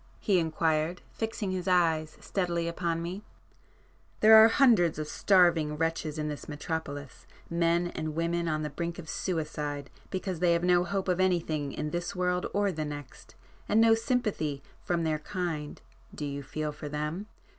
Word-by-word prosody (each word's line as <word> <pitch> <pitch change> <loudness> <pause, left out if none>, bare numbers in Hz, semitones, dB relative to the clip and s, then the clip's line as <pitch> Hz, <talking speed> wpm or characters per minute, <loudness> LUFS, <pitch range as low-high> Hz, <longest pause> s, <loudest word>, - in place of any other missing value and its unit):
he 195 -4 +2
inquired, 160 +1 0
fixing 220 -3 -3
his 185 0 -3
eyes 165 -4 +2
steadily 170 -3 -1
upon 170 -1 -2
me—"There 210 +3 -1
are 220 0 +10
hundreds 225 - +4
of 155 -1 -3
starving 170 -5 +3
wretches 165 -1 -1
in 150 0 -2
this 150 0 -6
metropolis,—men 160 +3 -2
and 155 -2 -4
women 170 +1 0
on 155 -1 -1
the 150 - -3
brink 170 +3 -4
of 170 - -8
suicide 150 -5 -3 0.2
because 185 -2 -3
they 175 -1 +4
have 170 0 0
no 180 0 +4
hope 195 +2 -2
of 180 -1 +1
anything 165 -6 +1
in 150 +2 -4
this 175 +1 -3
world 180 0 0
or 205 -1 +1
the 155 -3 -3
next, 145 -2 -8 0.3
and 215 - +4
no 225 0 +6
sympathy 215 - -1 0.2
from 170 -1 0
their 155 -1 0
kind—do 155 -4 -6
you 140 0 -4
feel 150 +2 -4
for 150 0 -7
them? 150 +7 -3
170 Hz, 155 wpm, -29 LUFS, 155-180 Hz, 0.3 s, are